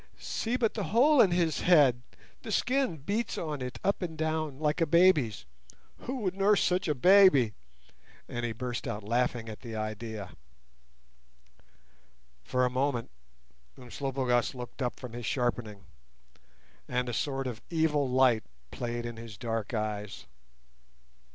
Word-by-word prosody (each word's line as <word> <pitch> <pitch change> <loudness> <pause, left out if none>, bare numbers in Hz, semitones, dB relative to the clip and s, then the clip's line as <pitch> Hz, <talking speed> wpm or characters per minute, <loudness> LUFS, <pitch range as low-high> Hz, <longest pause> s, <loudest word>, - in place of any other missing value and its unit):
"See 235 +2 -2
but 225 -4 +1
the 210 -4 -3
hole 265 +6 +5
in 200 - +5
his 175 -3 +1
head; 145 -9 +5 0.4
the 220 - -7
skin 255 -4 +1
beats 205 - -2
on 150 -4 -4
it 125 0 -5
up 200 - +1
and 165 -3 -4
down 155 -3 -2
like 155 +3 0
a 165 - +3
baby's! 160 - +3 0.5
Who 255 0 -5
would 185 -4 -1
nurse 200 +2 +3
such 180 +1 +1
a 150 - +1
baby?" 180 - +6 0.7
and 120 - -5
he 120 - -1
burst 125 +3 -4
out 110 -3 -4
laughing 120 +1 0
at 110 -1 -8
the 115 -2 -7
idea. 110 -2 -5 2.1
For 125 - +1
a - - +1
moment 130 - -1 0.7
Umslopogaas 130 0 -1
looked 125 +2 -8
up 125 -2 -2
from 125 -3 -8
his 120 -1 -5
sharpening, 120 -5 -2 1.0
and 125 0 -1
a 120 - -3
sort 135 +2 -2
of 120 -3 -5
evil 155 -4 +1
light 125 -4 +3 0.3
played 120 -1 -4
in 120 -1 -6
his 115 -3 -9
dark 115 -1 -3
eyes. 105 - -4
130 Hz, 145 wpm, -29 LUFS, 115-170 Hz, 2.1 s, baby